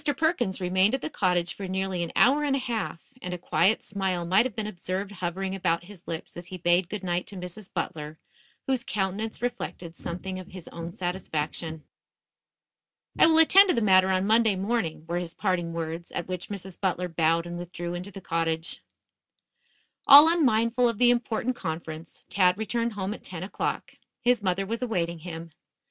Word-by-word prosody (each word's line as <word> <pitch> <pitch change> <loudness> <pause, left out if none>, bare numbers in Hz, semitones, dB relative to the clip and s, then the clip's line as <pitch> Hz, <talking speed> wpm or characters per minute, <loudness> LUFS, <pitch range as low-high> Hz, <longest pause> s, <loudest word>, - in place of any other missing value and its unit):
Perkins 315 - +1
remained 190 +5 +3
at 265 - -5
the - - -3
cottage 180 -5 +1
for 195 - -6
nearly 190 -1 -2
an 170 - -3
hour 285 +4 +5
and 280 -2 +1
a 265 - -2
half, 225 -2 -4
and 180 0 -4
a - - -6
quiet 195 +4 +2
smile 190 -3 -2
might 195 +8 +4
have 240 - -13
been 220 -2 -3
observed 190 0 -4
hovering 190 0 -3
about 175 -3 0
his 185 -1 -14
lips 165 -1 -6
as 175 0 -8
he 185 - -7
bade 175 +1 +2
good 205 -1 -5
night 175 -1 -1
to 200 - -7
Mrs. 180 +2 -8
Butler, 155 -3 -4 0.5
whose 260 -3 0
countenance 210 +3 -2
reflected 210 -8 -4
something 185 +3 -5
of 185 - -9
his 185 -3 -10
own 170 +1 -7
satisfaction. 160 -3 -3 1.4
"I - - +8
will 320 -1 +4
attend 380 +5 +7
to - - +3
the 230 - +1
matter 190 -2 +5
on 190 0 +2
Monday 220 -1 +4
morning," 190 -6 -2
were 170 +1 -1
his 175 -1 -6
parting 180 -4 -1
words, 165 +1 -5
at - - -3
which 180 -1 -4
Mrs. 190 -2 -7
Butler 180 -2 0
bowed 165 0 +1
and 175 0 -6
withdrew 175 0 -5
into 180 +3 -5
the 195 -1 -10
cottage. 165 -2 -2 1.3
All 290 +3 +11
unmindful 245 -7 +3
of 230 - -3
the 245 +1 +5
important 245 +1 -1
conference, 160 -3 -6
Tad 185 -2 +3
returned 230 +2 -1
home 200 0 -3
at - - -10
ten 180 -2 -7
o'clock. 190 - -3 0.3
His 245 -2 +3
mother 190 0 0
was 230 +4 -3
awaiting 175 -8 -1
him. 165 0 -8
185 Hz, 185 wpm, -27 LUFS, 175-220 Hz, 1.4 s, All